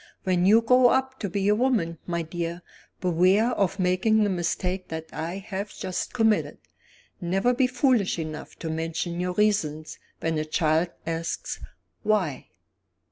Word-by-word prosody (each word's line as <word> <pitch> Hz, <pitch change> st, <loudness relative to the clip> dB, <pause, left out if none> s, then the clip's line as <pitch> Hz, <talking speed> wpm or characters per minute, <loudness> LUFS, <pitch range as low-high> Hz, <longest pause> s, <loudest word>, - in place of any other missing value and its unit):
"When 180 Hz, -1 st, +2 dB
you 225 Hz, +3 st, +6 dB
grow 250 Hz, +2 st, +6 dB
up 265 Hz, +1 st, +1 dB
to 200 Hz, -, -3 dB
be 195 Hz, +2 st, -1 dB
a 205 Hz, -, +5 dB
woman, 210 Hz, -9 st, +1 dB
my 170 Hz, -1 st, -1 dB
dear, 170 Hz, +1 st, -4 dB, 0.4 s
beware 185 Hz, +6 st, +3 dB
of 195 Hz, -4 st, 0 dB
making 190 Hz, +4 st, +3 dB
the 205 Hz, -, +1 dB
mistake 180 Hz, +1 st, -2 dB
that 160 Hz, 0 st, -5 dB
I 170 Hz, +4 st, -4 dB
have 195 Hz, +1 st, -5 dB
just 185 Hz, -2 st, -3 dB
committed. 225 Hz, -3 st, +1 dB, 0.6 s
Never 195 Hz, +8 st, +1 dB
be 255 Hz, +1 st, +3 dB
foolish 250 Hz, -7 st, +2 dB
enough 155 Hz, -2 st, -6 dB
to 160 Hz, -, -5 dB
mention 165 Hz, +2 st, -3 dB
your 180 Hz, 0 st, -1 dB
reasons 180 Hz, -7 st, 0 dB, 0.2 s
when 160 Hz, -1 st, -1 dB
a 155 Hz, -, -2 dB
child 155 Hz, +2 st, +2 dB, 0.2 s
asks, 165 Hz, 0 st, -3 dB, 0.4 s
Why?" 185 Hz, -11 st, 0 dB
185 Hz, 150 wpm, -26 LUFS, 165-215 Hz, 0.6 s, you